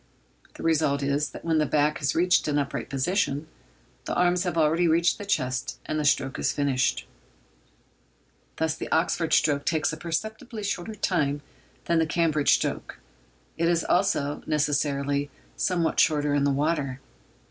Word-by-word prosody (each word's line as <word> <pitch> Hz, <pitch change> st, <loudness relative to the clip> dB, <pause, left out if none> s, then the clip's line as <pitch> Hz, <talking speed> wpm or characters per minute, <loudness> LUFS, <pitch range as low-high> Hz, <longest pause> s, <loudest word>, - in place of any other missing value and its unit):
The -, -, -9 dB
result 150 Hz, -3 st, +1 dB
is, 140 Hz, +1 st, 0 dB
that -, -, -11 dB
when 160 Hz, -1 st, +2 dB
the 150 Hz, -, +1 dB
back 150 Hz, +1 st, +1 dB
has 140 Hz, -, 0 dB
reached 180 Hz, +1 st, +3 dB
an 145 Hz, -1 st, +1 dB
upright 140 Hz, -2 st, -3 dB
position, 145 Hz, +1 st, -1 dB, 0.6 s
the -, -, -3 dB
arms 180 Hz, +1 st, +2 dB
have 175 Hz, -2 st, -2 dB
already 165 Hz, +2 st, +3 dB
reached 165 Hz, +2 st, +2 dB
the 205 Hz, -, -6 dB
chest, 130 Hz, -9 st, -1 dB
and 155 Hz, -, -2 dB
the 150 Hz, -, -1 dB
stroke 135 Hz, -2 st, +1 dB
is -, -, +1 dB
finished. 135 Hz, -3 st, 0 dB, 1.5 s
Thus 160 Hz, -1 st, 0 dB
the -, -, -6 dB
Oxford 165 Hz, 0 st, +1 dB
stroke 145 Hz, -2 st, +3 dB
takes 160 Hz, -1 st, 0 dB
a -, -, -5 dB
perceptibly 220 Hz, +7 st, -4 dB
shorter 200 Hz, +2 st, -3 dB
time 145 Hz, -7 st, 0 dB, 0.4 s
than 170 Hz, -1 st, +2 dB
the 160 Hz, -, +1 dB
Cambridge 155 Hz, -2 st, +2 dB
stroke; -, -, -3 dB, 0.6 s
it 170 Hz, 0 st, +2 dB
is 170 Hz, -1 st, +2 dB
also, 150 Hz, -6 st, +1 dB
necessarily, 145 Hz, -1 st, 0 dB, 0.3 s
somewhat 175 Hz, -3 st, 0 dB
shorter 150 Hz, -2 st, +3 dB
in 145 Hz, -1 st, +2 dB
the -, -, +3 dB
water. 140 Hz, -2 st, -1 dB
155 Hz, 160 wpm, -26 LUFS, 145-170 Hz, 1.5 s, reached